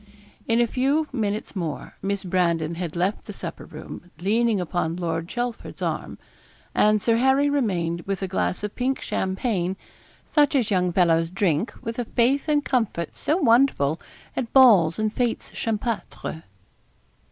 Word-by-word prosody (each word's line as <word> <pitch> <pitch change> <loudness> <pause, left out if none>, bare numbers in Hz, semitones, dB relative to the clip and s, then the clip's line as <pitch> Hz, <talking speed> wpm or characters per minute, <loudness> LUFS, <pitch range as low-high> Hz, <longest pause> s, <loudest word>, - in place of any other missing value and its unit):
In 230 0 +3
a 240 - +5
few 275 +6 +1
minutes 215 -3 -2
more 165 -6 -4
Miss 200 0 -2
Brandon 170 -3 +1
had 170 -1 -5
left 185 +4 -1
the - - -7
supper - - -7
room 180 - -10
leaning 215 +4 +1
upon 175 -2 -1
Lord 165 -2 -2
Chelford's 240 +2 -4
arm; - - -3 0.6
and 215 0 +4
Sir 230 +2 +2
Harry 265 +3 +3
remained, 175 -11 0
with 195 -1 -2
a - - -1
glass 185 +1 -1
of 210 - -3
pink 260 +2 0
champagne, 190 -1 -1 0.5
such 290 -1 +3
as 235 -6 +1
young 180 -2 +2
fellows 165 -2 +3
drink 185 - 0
with 230 0 -4
a 245 - -1
faith 255 +7 +1
and 295 -1 +2
comfort 225 - -1
so 310 - 0
wonderful, 230 - +3 0.3
at 240 -3 -3
balls 205 -12 +6
and 215 0 -1
fêtes 240 -2 -1
champêtres. 220 -7 -3
210 Hz, 150 wpm, -24 LUFS, 175-245 Hz, 0.6 s, balls